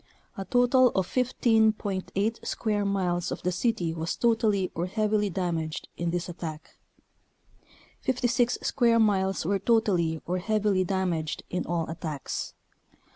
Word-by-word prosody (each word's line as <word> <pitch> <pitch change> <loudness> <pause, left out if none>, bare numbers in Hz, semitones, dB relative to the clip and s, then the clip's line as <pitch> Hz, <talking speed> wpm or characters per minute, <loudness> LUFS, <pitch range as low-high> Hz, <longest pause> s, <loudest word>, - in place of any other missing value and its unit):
A 195 - -5
total 245 +2 +4
of 190 - +2
1J.8 220 -3 +1
square 210 -2 -1
miles 180 -3 0
of - - -5
the 180 - +1
city 180 -3 0
was 165 0 -3
totally 220 -5 +1
or 170 +2 -2
heavily 210 +1 +1
damaged 165 -4 -3
in 170 0 -2
this 175 +1 -2
at 175 -1 -9
tack; 155 -2 -7 1.2
56 245 -1 +1
square 235 -3 +3
miles 195 -5 +2
were 200 +3 +1
totally 185 -7 +2
or 180 +1 -1
heavily 210 -1 +1
damaged 180 -4 -2
in 180 - -2
all 170 -2 -1
attacks. 155 -3 -5
195 Hz, 130 wpm, -27 LUFS, 175-220 Hz, 1.2 s, total